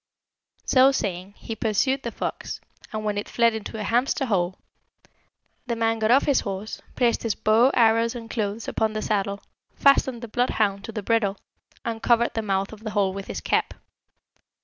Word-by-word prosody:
"So 265 Hz, +1 st, +5 dB
saying, 195 Hz, -5 st, -3 dB
he 225 Hz, -, -6 dB
pursued 250 Hz, +6 st, +1 dB
the 235 Hz, -, -4 dB
fox, -, -, -5 dB, 0.3 s
and 215 Hz, -1 st, -4 dB
when 205 Hz, -1 st, 0 dB
it -, -, -6 dB
fled 235 Hz, -1 st, +3 dB
into 220 Hz, 0 st, -6 dB
a -, -, -3 dB
hamster's 245 Hz, +3 st, +1 dB
hole, 185 Hz, -2 st, 0 dB, 1.1 s
the 235 Hz, -, -1 dB
man 225 Hz, 0 st, 0 dB
got 220 Hz, 0 st, +1 dB
off 265 Hz, +4 st, +5 dB
his 285 Hz, -3 st, +3 dB
horse, 200 Hz, +1 st, -5 dB
placed 240 Hz, -2 st, +2 dB
his 225 Hz, -2 st, -1 dB
bow, 225 Hz, +4 st, +4 dB
arrows, 230 Hz, 0 st, +3 dB
and 230 Hz, -1 st, -7 dB
clothes 220 Hz, -1 st, -3 dB
upon 220 Hz, -1 st, 0 dB
the 215 Hz, -, -3 dB
saddle, 200 Hz, -1 st, -1 dB, 0.3 s
fastened 260 Hz, -3 st, +3 dB
the -, -, -5 dB
bloodhound 210 Hz, -4 st, 0 dB
to -, -, -6 dB
the 215 Hz, -2 st, -5 dB
bridle, 205 Hz, -3 st, +1 dB, 0.5 s
and 225 Hz, -1 st, -3 dB
covered 235 Hz, 0 st, +3 dB
the 225 Hz, -, -1 dB
mouth 195 Hz, -1 st, -1 dB
of 215 Hz, -, -10 dB
the 220 Hz, 0 st, -5 dB
hole 200 Hz, -3 st, +1 dB
with 195 Hz, 0 st, -7 dB
his -, -, -5 dB
cap. -, -, 0 dB
220 Hz, 185 wpm, -24 LUFS, 205-235 Hz, 1.1 s, So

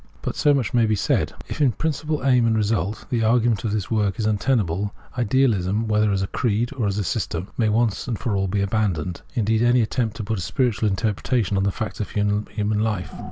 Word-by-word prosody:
'' -, -, -29 dB
But -, -, -3 dB
so 145 Hz, -, +3 dB
much 135 Hz, -7 st, 0 dB
may 120 Hz, -2 st, +4 dB
be 110 Hz, -, +2 dB
said: -, -, 0 dB
— -, -, -17 dB
if, -, -, -6 dB
''n 135 Hz, -5 st, +2 dB
principle 155 Hz, -2 st, -2 dB
aim 125 Hz, -3 st, +4 dB
and 110 Hz, -1 st, +2 dB
result, 105 Hz, -1 st, -1 dB
the 115 Hz, -2 st, +1 dB
argument 115 Hz, -1 st, +2 dB
of 110 Hz, -, -1 dB
this 105 Hz, -1 st, -2 dB
work 105 Hz, -3 st, +1 dB
is 110 Hz, -, -1 dB
untenable, 105 Hz, -3 st, 0 dB, 0.2 s
idealism, 115 Hz, -4 st, +1 dB
whether 105 Hz, -1 st, +2 dB
as 95 Hz, -1 st, 0 dB
a -, -, -2 dB
creed 115 Hz, +3 st, 0 dB
or 115 Hz, -6 st, 0 dB
a -, -, +1 dB
systeri, 95 Hz, -3 st, -2 dB
may 115 Hz, -, +1 dB
be 105 Hz, -, +1 dB
once 115 Hz, 0 st, 0 dB
for 105 Hz, 0 st, -2 dB
all 95 Hz, 0 st, +1 dB
abandoned 95 Hz, -3 st, -1 dB
— -, -, -29 dB
and 110 Hz, -4 st, 0 dB
indeed 110 Hz, 0 st, +2 dB
any 120 Hz, +1 st, +4 dB
attempt 110 Hz, 0 st, -2 dB
to 110 Hz, -, -4 dB
put 105 Hz, 0 st, -2 dB
a -, -, -4 dB
spiritual 110 Hz, +2 st, 0 dB
interpretation 105 Hz, +1 st, 0 dB
upon 95 Hz, 0 st, +1 dB
the 100 Hz, -, +2 dB
facts 110 Hz, +2 st, -5 dB
of 105 Hz, -, -3 dB
human 105 Hz, 0 st, -1 dB
life. 105 Hz, -4 st, -1 dB
110 Hz, 230 wpm, -23 LUFS, 100-120 Hz, 0.2 s, may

